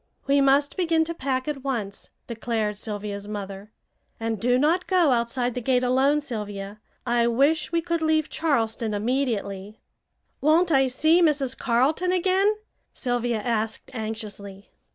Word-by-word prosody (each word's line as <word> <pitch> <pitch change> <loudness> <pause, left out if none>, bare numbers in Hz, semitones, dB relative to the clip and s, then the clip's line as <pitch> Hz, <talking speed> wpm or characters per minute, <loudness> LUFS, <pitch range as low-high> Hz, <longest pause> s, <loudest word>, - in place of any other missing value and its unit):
"We 280 0 +3
must 275 +3 +3
begin 330 -3 +2
to 335 +1 -4
pack 260 -3 -2
at 280 -3 -4
once," 220 -8 -4 0.2
declared 225 -2 -2
Sylvia's 205 -1 -5
mother, 200 0 -7 0.5
"and 225 -2 -2
do 245 +1 +3
not 325 +7 +1
go 355 -6 +3
outside 245 +1 0
the 250 - -4
gate 250 +1 +1
alone, 265 +4 +3
Sylvia. 210 -5 -6 0.3
I 240 -1 +2
wish 280 +9 +2
we 335 -1 +1
could 335 -1 -2
leave 315 -1 +2
Charleston 225 -8 -1
immediately." 210 -4 -2 0.6
"Won't 330 +4 +3
I 270 -2 +4
see 315 +7 +3
Mrs. 285 -5 +2
Carleton 270 +9 +1
again?" 380 +3 +2 0.4
Sylvia 245 -2 -1
asked 225 -1 -2
anxiously. 210 -3 -7
250 Hz, 140 wpm, -25 LUFS, 220-300 Hz, 0.6 s, I